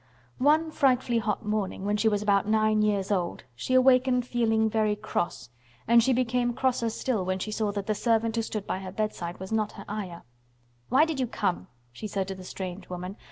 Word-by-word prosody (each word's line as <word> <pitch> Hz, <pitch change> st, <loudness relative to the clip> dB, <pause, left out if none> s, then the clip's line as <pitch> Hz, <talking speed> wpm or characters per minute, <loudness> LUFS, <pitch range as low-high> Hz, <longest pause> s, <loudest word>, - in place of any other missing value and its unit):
One 310 Hz, +4 st, +3 dB
frightfully 255 Hz, -5 st, +2 dB
hot 210 Hz, -2 st, -2 dB
morning, 210 Hz, -2 st, -2 dB
when 205 Hz, +1 st, +1 dB
she 210 Hz, +2 st, +1 dB
was 205 Hz, -1 st, 0 dB
about 200 Hz, -1 st, +2 dB
nine 215 Hz, 0 st, +3 dB
years 205 Hz, -2 st, +1 dB
old, 180 Hz, -, -1 dB
she 130 Hz, -, -2 dB
awakened 255 Hz, -1 st, +4 dB
feeling 225 Hz, -3 st, +2 dB
very 215 Hz, -1 st, +1 dB
cross, 205 Hz, -, -3 dB, 0.4 s
and 235 Hz, +1 st, +6 dB
she 260 Hz, +3 st, +2 dB
became 245 Hz, -1 st, +1 dB
crosser 250 Hz, -3 st, +1 dB
still 225 Hz, -2 st, -1 dB
when 185 Hz, +1 st, -1 dB
she 215 Hz, +3 st, -4 dB
saw 215 Hz, -1 st, 0 dB
that 200 Hz, -1 st, -3 dB
the 215 Hz, -, +1 dB
servant 225 Hz, +1 st, +1 dB
who 230 Hz, -, +1 dB
stood 215 Hz, -2 st, -4 dB
by 185 Hz, -, -2 dB
her 190 Hz, -1 st, -7 dB
bedside 185 Hz, -4 st, -3 dB
was 190 Hz, +2 st, -7 dB
not 215 Hz, -1 st, 0 dB
her 200 Hz, -, -10 dB
Ayah. 195 Hz, -5 st, -5 dB, 0.7 s
"Why 270 Hz, +6 st, +5 dB
did 320 Hz, -4 st, -3 dB
you 255 Hz, -, +1 dB
come?" 195 Hz, -5 st, -2 dB, 0.2 s
she 215 Hz, -, -7 dB
said 195 Hz, -2 st, -2 dB
to -, -, -2 dB
the 190 Hz, -1 st, -10 dB
strange 185 Hz, 0 st, -7 dB
woman. 180 Hz, +3 st, -6 dB
215 Hz, 205 wpm, -27 LUFS, 195-240 Hz, 0.7 s, and